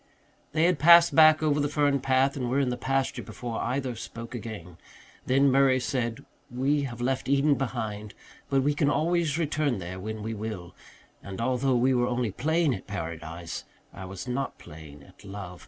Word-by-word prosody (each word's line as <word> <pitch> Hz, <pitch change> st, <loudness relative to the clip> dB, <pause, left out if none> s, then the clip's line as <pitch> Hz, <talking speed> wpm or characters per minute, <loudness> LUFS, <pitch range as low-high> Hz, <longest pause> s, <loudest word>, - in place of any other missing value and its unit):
They 160 Hz, +1 st, +2 dB
had 175 Hz, -3 st, +3 dB
passed 170 Hz, +3 st, +7 dB
back 155 Hz, 0 st, +6 dB
over 150 Hz, -1 st, +2 dB
the 145 Hz, 0 st, 0 dB
fern 145 Hz, -2 st, +2 dB
path 135 Hz, +1 st, +2 dB
and 125 Hz, -3 st, -3 dB
were 135 Hz, +3 st, +1 dB
in 135 Hz, -2 st, +1 dB
the 125 Hz, -, -1 dB
pasture 135 Hz, +2 st, -1 dB
before 120 Hz, -2 st, -6 dB
either 130 Hz, 0 st, -2 dB
spoke 115 Hz, +1 st, -8 dB
again. 105 Hz, -8 st, -8 dB, 0.5 s
Then 135 Hz, +1 st, +4 dB
Murray 135 Hz, -1 st, +4 dB
said, 120 Hz, -3 st, -3 dB, 0.2 s
"We 140 Hz, +4 st, 0 dB
have 120 Hz, -2 st, -7 dB
left 130 Hz, +1 st, -1 dB
Eden 140 Hz, +1 st, +3 dB
behind 110 Hz, -6 st, -4 dB, 0.3 s
but 135 Hz, -1 st, +2 dB
we 145 Hz, +2 st, +2 dB
can 145 Hz, 0 st, +1 dB
always 160 Hz, 0 st, +1 dB
return 155 Hz, -5 st, 0 dB
there 90 Hz, 0 st, -6 dB
when 110 Hz, +2 st, -6 dB
we 110 Hz, +1 st, -3 dB
will. 105 Hz, -5 st, -6 dB, 0.5 s
And 95 Hz, -1 st, -8 dB
although 130 Hz, +2 st, +1 dB
we 130 Hz, +2 st, +3 dB
were 120 Hz, -1 st, +2 dB
only 120 Hz, -3 st, -1 dB
playing 160 Hz, -, +1 dB
at 95 Hz, -, -7 dB
paradise, 85 Hz, -3 st, -6 dB, 0.3 s
I 95 Hz, -, -8 dB
was 95 Hz, +5 st, -8 dB
not 130 Hz, +2 st, -3 dB
playing 75 Hz, -3 st, -12 dB
at 70 Hz, -, -19 dB
love. 95 Hz, -3 st, -8 dB
125 Hz, 185 wpm, -27 LUFS, 105-140 Hz, 0.5 s, passed